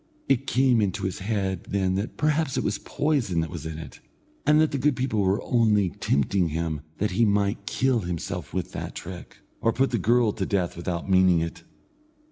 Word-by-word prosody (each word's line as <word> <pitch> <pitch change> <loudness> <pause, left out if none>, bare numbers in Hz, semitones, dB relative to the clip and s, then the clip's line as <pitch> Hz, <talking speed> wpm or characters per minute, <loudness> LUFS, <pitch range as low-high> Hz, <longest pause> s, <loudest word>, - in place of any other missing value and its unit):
It 135 0 +1
came 130 -3 +3
into 100 0 -1
his 95 -2 -2
head 95 -2 -2
then 95 -2 +1
that 100 +5 -3
perhaps 155 -2 +1
it - - 0
was 100 0 -1
poison 135 - 0
that 80 -1 -4
was 80 -3 -6
in 80 -1 -6
it, 80 - -9 0.5
and 150 +1 +6
that 155 0 +3
the 140 - -1
good 145 +1 +2
people 125 -5 0
were 95 +1 +1
only 105 -5 +3
tempting 85 +6 +1
him 80 -1 -2 0.2
that 105 0 0
he 100 +6 +2
might 100 -1 +1
kill 130 +2 +1
himself 85 -4 -4
with - - -3
that - - -6
trick, 90 0 -8 0.2
or 115 - +3
put 135 +4 +1
the 120 - +1
girl 115 +3 +3
to 95 - -2
death 95 -4 0
without 85 0 -4
meaning 95 -2 +5
it. 85 0 -4
100 Hz, 200 wpm, -26 LUFS, 90-120 Hz, 0.5 s, and